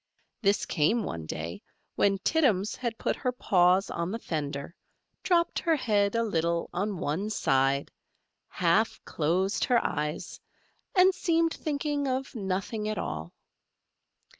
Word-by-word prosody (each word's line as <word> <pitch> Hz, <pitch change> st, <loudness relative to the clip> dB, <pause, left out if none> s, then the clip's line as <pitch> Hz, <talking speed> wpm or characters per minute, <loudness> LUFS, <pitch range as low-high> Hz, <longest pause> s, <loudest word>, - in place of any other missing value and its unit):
This 200 Hz, -2 st, +2 dB
came 195 Hz, +9 st, +1 dB
one 80 Hz, -, -5 dB
day, 80 Hz, +2 st, -5 dB, 0.3 s
when 195 Hz, -1 st, +3 dB
Tittums 215 Hz, -, +2 dB
had 235 Hz, -3 st, -3 dB
put -, -, -1 dB
her 250 Hz, -, -1 dB
paws 185 Hz, -5 st, +3 dB
on 170 Hz, +1 st, -2 dB
the 220 Hz, -, -2 dB
fender, 145 Hz, -6 st, -4 dB, 0.5 s
dropped 340 Hz, -2 st, +2 dB
her 330 Hz, -2 st, +2 dB
head 205 Hz, -6 st, +1 dB
a 230 Hz, -, +2 dB
little 170 Hz, -5 st, -1 dB
on 195 Hz, +2 st, -1 dB
one 175 Hz, +8 st, -2 dB
side, 135 Hz, -8 st, +1 dB, 0.6 s
half -, -, +1 dB
closed 185 Hz, +6 st, 0 dB
her 245 Hz, -, +3 dB
eyes, 150 Hz, 0 st, -3 dB, 0.6 s
and 375 Hz, 0 st, +6 dB
seemed 330 Hz, -2 st, +1 dB
thinking 290 Hz, -1 st, -2 dB
of 260 Hz, +1 st, -2 dB
nothing 205 Hz, 0 st, -2 dB
at 215 Hz, -, -2 dB
all. 80 Hz, +2 st, -4 dB
200 Hz, 135 wpm, -28 LUFS, 165-250 Hz, 0.6 s, and